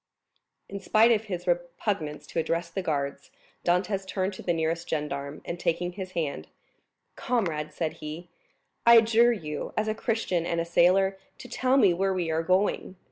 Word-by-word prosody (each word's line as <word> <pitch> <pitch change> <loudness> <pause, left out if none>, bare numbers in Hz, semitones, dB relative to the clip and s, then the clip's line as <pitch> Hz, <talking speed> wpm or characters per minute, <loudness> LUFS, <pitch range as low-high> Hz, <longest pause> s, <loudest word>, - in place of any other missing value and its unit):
In 200 - -6
spite 220 +4 +4
of 220 -1 +2
his 180 -4 -5
repugnance 175 -2 -2
to - - -3
address 170 +1 -1
the 190 - -2
guards, 145 - -3 0.3
Dantès 185 +3 +1
turned 190 +1 -2
to - - -9
the 175 - -1
nearest 165 +1 -1
gendarme, 140 -2 -4
and 170 - -5
taking 175 +1 -1
his 185 0 -7
hand, 140 - -3 0.7
"Comrade," 165 -11 -1
said 160 -2 -3
he, 155 +3 -7 0.6
"I 235 0 +8
adjure 230 +1 +5
you, 150 -9 -5
as 215 0 +1
a 215 - +1
Christian 220 -6 -1
and 170 0 -1
a 165 - -1
soldier, 190 +3 +3 0.2
to - - -10
tell 255 +1 +1
me 200 -9 +5
where 190 +2 0
we 170 -3 -1
are 160 +1 +1
going. 185 +2 0
175 Hz, 175 wpm, -27 LUFS, 165-200 Hz, 0.7 s, I